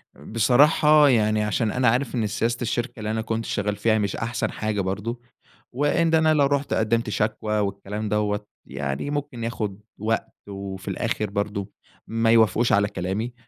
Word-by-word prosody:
بصراحة 145 +7 +4
يعني 110 -3 +2
عشان 105 +1 0
أنا 125 +2 +1
عارف 125 +3 +1
إن 110 -3 0
سياسة 115 +3 -1
الشركة 120 0 -2
اللي 105 0 -3
أنا 110 0 -1
كنت 115 0 -3
شغال 105 0 -1
فيها 110 +1 +2
مش 100 -2 -1
أحسن 115 -1 -2
حاجة 105 -2 -2
برضه، 105 +6 -3 0.5
وإن 145 +5 +1
أنا 160 0 +4
لو 145 -2 +4
رُحت 140 0 0
قدِّمت 115 +1 +1
شكوى 105 0 -1
والكلام 100 +1 -3
دوَّة 105 0 0 0.2
يعني 70 - -4
ممكن 145 -5 -4
ياخد 105 -4 -3 0.2
وقت، 110 +2 -2 0.2
وفي 95 -1 -7
الآخر 105 -2 -2
برضه 100 0 -3 0.4
ما 115 0 +1
يوافقوش 115 +1 +4
على 100 -1 +4
كلامي، 105 +6 -3
110 Hz, 160 wpm, -24 LUFS, 105-120 Hz, 0.5 s, بصراحة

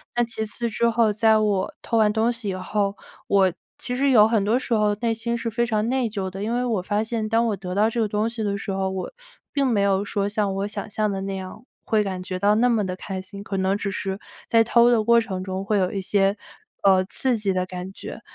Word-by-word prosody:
那 240 - +3
其 225 -2 -3
次 235 +2 -3
之 235 +1 +1
后， 230 -1 +3
在 220 +1 +4
我 205 -3 0
偷 230 - -1
完 215 -1 +4
东 225 +2 +2
西 230 -3 -6
以 190 - -2
后， 200 +2 -1 0.3
我 195 -2 +4 0.3
其 245 - -4
实 275 +2 +2
有 215 -4 +7
很 220 -3 +1
多 220 +4 +3
时 250 - -3
候 210 -1 +2
内 235 -1 +1
心 230 +1 -2
是 230 0 -3
非 235 +2 0
常 220 -1 0
内 260 -1 +1
疚 195 -3 -3
的， 190 +1 -7
因 225 +2 -1
为 245 +1 0
我 225 -6 0
发 205 +3 0
现 225 -1 -2
当 225 +2 +2
我 215 - 0
得 180 -1 -6
到 210 +2 +3
这 235 - -3
个 220 - +2
东 210 +2 0
西 230 -1 -6
的 200 -1 -1
时 200 - -5
候， 190 0 -1
我 190 -1 -4 0.4
并 280 -1 +1
没 220 -5 +2
有 200 0 +2
说 200 0 -1
像 205 -1 0
我 195 +1 -1
想 210 -1 -6
象 215 0 0
的 195 - -3
那 195 0 -3
样 190 +5 -8 0.2
会 215 -1 +2
感 190 -2 -4
觉 185 0 -4
到 205 +2 +4
那 245 +3 +3
么 220 -4 +1
地 185 -1 -3
开 190 0 -6
心， 200 +1 -10
可 195 -1 -4
能 190 +1 +1
只 200 0 -2
是 195 0 -3 0.3
在 230 -1 +5
偷 235 +1 +5
的 235 -3 +3
过 235 +1 +5
程 190 -5 -4
中 190 +1 -4
会 210 +1 +1
有 185 -1 +1
一 200 - -3
些， 195 +1 +1 0.5
呃， 190 -1 +5
刺 250 +5 -1
激 205 -2 -1
的 185 -1 0
感 185 0 -7
觉。 - - -9
210 Hz, 280 characters per minute, -23 LUFS, 195-230 Hz, 0.5 s, 有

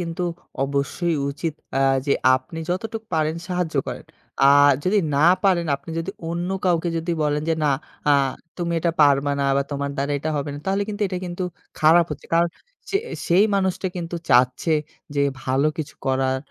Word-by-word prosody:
কিন্তু 170 0 -3 0.4
অবশ্যই 140 +5 -1 0.2
উচিত 150 +2 -4 0.2
আ - - +2 0.3
যে 140 - +3 0.2
আপনি 130 +5 -5
যতটুকু 220 +4 -3
পারেন 155 0 +1
সাহায্য 180 -3 -2
করেন। - - -6 0.4
আ - - +8 0.4
যদি 205 +3 +3 0.2
না 150 +4 +4 0.2
পারেন, 180 -3 +3
আপনি 165 - -12
যদি 165 +4 -3 0.2
অন্য 170 +2 -2 0.2
কাউকে 175 -1 +2
যদি 165 +1 -1
বলেন 150 0 0
যে 165 - +3
"না 145 - +3 0.4
আ - - +5 0.5
তুমি 170 -1 -2
এটা 170 +1 +1
পারবা 145 -1 +4
না - - +1
বা 140 - +2
তোমার 140 0 -2
দ্বারা 140 +1 -1
এটা 155 +3 -3
হবে 145 0 -2
না - - -6
তাহলে 195 +1 +1
কিন্তু 210 0 -3
এটা 185 -1 -3
কিন্তু 175 +1 -4 0.4
খারাপ 165 +2 +6
হচ্ছে।" 150 - -7
কারণ 170 +1 +4 0.4
সে 395 - +2 0.3
সেই 180 +4 +5
মানুষটা 190 -1 0
কিন্তু 170 0 -4
চাচ্ছে, 125 +5 +3 0.4
যে 140 - +1 0.2
ভালো 135 +3 +1
কিছু 155 - -5
করার 130 0 +1
165 Hz, 180 wpm, -23 LUFS, 140-180 Hz, 0.5 s, আ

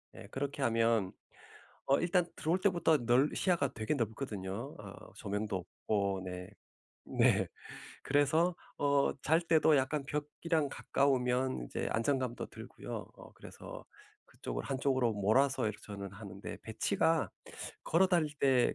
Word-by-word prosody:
예. - - -10
그렇게 140 +1 -3
하면 115 -4 +2 0.8
어 135 - +4
일단 175 +1 +2
들어올 170 +4 0
때부터 175 -5 +3
넓 125 +5 +3
시야가 155 -7 +1
되게 110 +5 -1
넓거든요. 110 0 -4
어 100 -2 -11
조명도 105 -1 -2 0.4
없고 100 -2 +1
네. 90 +1 -6 0.6
네. - - +3 0.6
그래서 150 +5 +3 0.2
어 140 -1 +3
잘 160 +3 +4
때도 160 -2 +4
약간 135 +2 0
벽이랑 150 +1 -1
가까우면 130 - +1
이제 - - -3
안정감도 125 0 0
들고요. - - -7
어 - - -13
그래서 - - -10 0.4
그쪽을 - - -5
한쪽으로 130 -3 +1
몰아서 125 +6 +3
이렇게 105 -1 -3
저는 100 -2 -6
하는데 100 -2 -8
배치가 130 - +1 0.5
걸어 180 +4 +4
다닐 160 -5 +2
때 130 -3 +4
130 Hz, 280 characters per minute, -33 LUFS, 110-150 Hz, 0.8 s, 어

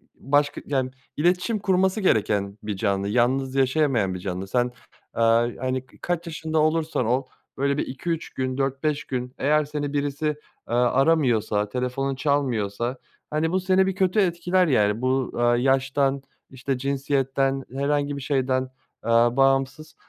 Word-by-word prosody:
başka, 145 +1 0
yani, 130 -2 -1 0.3
iletişim 180 +7 +1
kurması 190 +2 +1
gereken 100 - +1
bir 105 -2 -3
canlı, 100 -1 0
yalnız 130 +4 +1
yaşayamayan 130 -7 +2
bir 90 - -5
canlı. 95 +1 -4
Sen, 120 +4 +1 0.5
eee, - - +1 0.4
hani 130 0 -2
k - - -22
kaç 175 -1 -2
yaşında 160 0 -2
olursan 155 -4 +1
ol, 125 +4 +1 0.3
böyle, 140 +1 +1
bir - - 0
2-3 165 +5 -4
gün, 130 0 -2
4-5 140 +2 -1
gün 125 -1 -4
eğer 150 +2 +2
seni 145 -1 -4
birisi, 145 +1 -2
eee, 150 -5 -5
aramıyorsa, 125 -5 +2
telefonun 125 +3 -2
çalmıyorsa, 125 -5 -1 0.3
hani, 155 +2 0
bu 185 - +2
seni 190 +1 +3
bir 190 - -1
kötü 190 +2 +2
etkiler 180 0 +2
yani. 105 -4 +2
Bu, 130 0 0
aaa, 120 0 +3
yaştan, 135 +1 +1 0.3
işte, 130 0 -3
cinsiyetten, 135 0 0
herhangi 145 +1 0
bir - - -6
şeyden, 130 -2 0 0.4
aaa, 115 +2 +3
bağımsız 135 +3 +1
135 Hz, 145 wpm, -24 LUFS, 125-150 Hz, 0.5 s, seni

